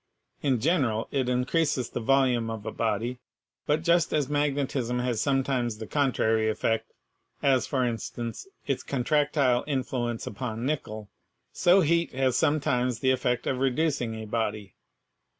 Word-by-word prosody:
In 135 Hz, -4 st, +1 dB
general, 130 Hz, -6 st, +1 dB
it 130 Hz, -3 st, 0 dB
in 125 Hz, 0 st, +1 dB
creases 145 Hz, -4 st, 0 dB
the -, -, -3 dB
volume 125 Hz, -2 st, +2 dB
of 110 Hz, -1 st, -6 dB
a -, -, -3 dB
body; 115 Hz, +3 st, -2 dB, 0.5 s
but 155 Hz, +2 st, +1 dB
just 170 Hz, -1 st, +3 dB
as 145 Hz, -3 st, +1 dB
magnetism 140 Hz, -4 st, 0 dB
has 125 Hz, -3 st, -1 dB
sometimes 135 Hz, -5 st, 0 dB
the 110 Hz, -, -6 dB
contrary 110 Hz, -5 st, +1 dB
effect 115 Hz, +1 st, -1 dB, 0.5 s
(as, 130 Hz, -4 st, +3 dB
for 130 Hz, -2 st, 0 dB
instance, 115 Hz, -, -4 dB, 0.2 s
its 135 Hz, -2 st, -1 dB
con 130 Hz, -3 st, -3 dB
tractile 145 Hz, -4 st, +2 dB
influence 125 Hz, -4 st, -2 dB
upon 115 Hz, +1 st, -4 dB
nickel), 110 Hz, -8 st, -3 dB, 0.4 s
so 185 Hz, +3 st, +5 dB
heat 170 Hz, +1 st, +1 dB
has 130 Hz, -1 st, +1 dB
sometimes 130 Hz, -6 st, +1 dB
the 130 Hz, -, +3 dB
effect 125 Hz, -1 st, 0 dB
of 130 Hz, -, -1 dB
reducing 135 Hz, -3 st, 0 dB
a 110 Hz, 0 st, -6 dB
body. 105 Hz, -3 st, -3 dB
125 Hz, 150 wpm, -27 LUFS, 115-140 Hz, 0.5 s, so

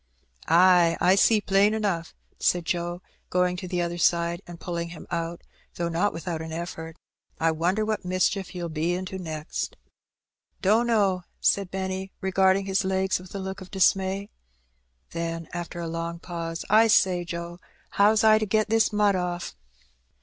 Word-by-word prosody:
" -, -, -23 dB
Ay, 175 Hz, 0 st, +5 dB
I 185 Hz, -, +5 dB
see 210 Hz, +2 st, +4 dB
plain 205 Hz, +2 st, +3 dB
enough," 190 Hz, -6 st, -2 dB, 0.2 s
said 175 Hz, -2 st, +1 dB
Joe, 175 Hz, +2 st, -2 dB, 0.3 s
going 180 Hz, 0 st, +1 dB
to 185 Hz, -, -6 dB
the 175 Hz, -1 st, -1 dB
other 170 Hz, 0 st, -3 dB
side, 170 Hz, +1 st, +2 dB
and 175 Hz, -1 st, -10 dB
pulling 170 Hz, -1 st, -4 dB
him 170 Hz, -2 st, -10 dB
out, 170 Hz, 0 st, -3 dB, 0.3 s
though 170 Hz, -1 st, -2 dB
not 175 Hz, +5 st, +1 dB
without 165 Hz, -1 st, -4 dB
an 160 Hz, 0 st, -6 dB
effort. 165 Hz, 0 st, -6 dB, 0.4 s
"I 165 Hz, 0 st, +3 dB
wonder 180 Hz, +7 st, 0 dB
what 215 Hz, -1 st, -2 dB
mischief 185 Hz, +1 st, -1 dB
you'll 175 Hz, -1 st, -4 dB
be 165 Hz, +3 st, -1 dB
into 185 Hz, +1 st, -5 dB
next?" 155 Hz, -3 st, -5 dB, 0.8 s
"Dunno,'^ 205 Hz, -3 st, +2 dB
said 200 Hz, -2 st, +2 dB
Benny, 190 Hz, 0 st, -4 dB
regarding 190 Hz, 0 st, +2 dB
his 195 Hz, 0 st, +1 dB
legs 190 Hz, 0 st, 0 dB
with 185 Hz, +1 st, -12 dB
a -, -, -1 dB
look 190 Hz, 0 st, -5 dB
of 185 Hz, -, -10 dB
dismay. 195 Hz, +1 st, +1 dB, 0.8 s
Then, 165 Hz, -1 st, -4 dB
after 175 Hz, 0 st, -5 dB
a 170 Hz, -, -3 dB
long 165 Hz, +1 st, -4 dB
pause, 165 Hz, -1 st, -5 dB
"1 220 Hz, +1 st, +6 dB
say, 185 Hz, -4 st, +4 dB
Joe, 170 Hz, 0 st, -6 dB, 0.3 s
how's 210 Hz, +2 st, +4 dB
I 215 Hz, 0 st, +6 dB
to 215 Hz, -, -1 dB
get 215 Hz, +1 st, +1 dB
this 225 Hz, 0 st, +3 dB
mud 210 Hz, -1 st, +3 dB
off?" 175 Hz, -, -3 dB
180 Hz, 165 wpm, -26 LUFS, 170-195 Hz, 0.8 s, 1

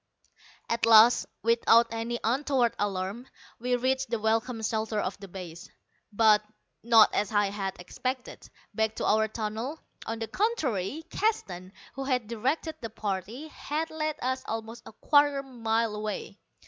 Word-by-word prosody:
At 230 Hz, 0 st, 0 dB
last, 225 Hz, +2 st, +7 dB, 0.2 s
without 230 Hz, 0 st, +4 dB
any 230 Hz, +1 st, -3 dB
untoward 255 Hz, 0 st, +1 dB
alarm, 200 Hz, +4 st, -2 dB, 0.3 s
we 245 Hz, +1 st, 0 dB
reached 260 Hz, +1 st, 0 dB
the 230 Hz, -, 0 dB
welcome 225 Hz, +2 st, 0 dB
shelter 220 Hz, 0 st, -1 dB
of 190 Hz, -1 st, -2 dB
the 200 Hz, -, -9 dB
base, 175 Hz, -2 st, -9 dB, 0.4 s
but 215 Hz, 0 st, +5 dB, 0.4 s
not, 225 Hz, -1 st, +6 dB
as 205 Hz, -1 st, 0 dB
I 205 Hz, -2 st, +2 dB
had 195 Hz, -2 st, -4 dB
expected, 255 Hz, +8 st, -5 dB, 0.2 s
back 220 Hz, 0 st, 0 dB
to -, -, -3 dB
our 220 Hz, +1 st, +3 dB
tunnel. 225 Hz, +7 st, -4 dB, 0.3 s
On 225 Hz, -, -3 dB
the 225 Hz, 0 st, -4 dB
contrary, 300 Hz, -, -1 dB
Keston, 190 Hz, -, -1 dB, 0.2 s
who 270 Hz, 0 st, -5 dB
had 250 Hz, -5 st, 0 dB
directed 270 Hz, +8 st, -2 dB
the 230 Hz, -, -5 dB
party, 215 Hz, -, -4 dB
had 315 Hz, +2 st, -4 dB
led 310 Hz, -1 st, -2 dB
us 260 Hz, +1 st, -1 dB
almost 225 Hz, +1 st, -5 dB
a -, -, -9 dB
quarter 285 Hz, +4 st, +3 dB
mile 230 Hz, -4 st, -1 dB
away. 210 Hz, -1 st, -5 dB
225 Hz, 145 wpm, -28 LUFS, 210-260 Hz, 0.4 s, last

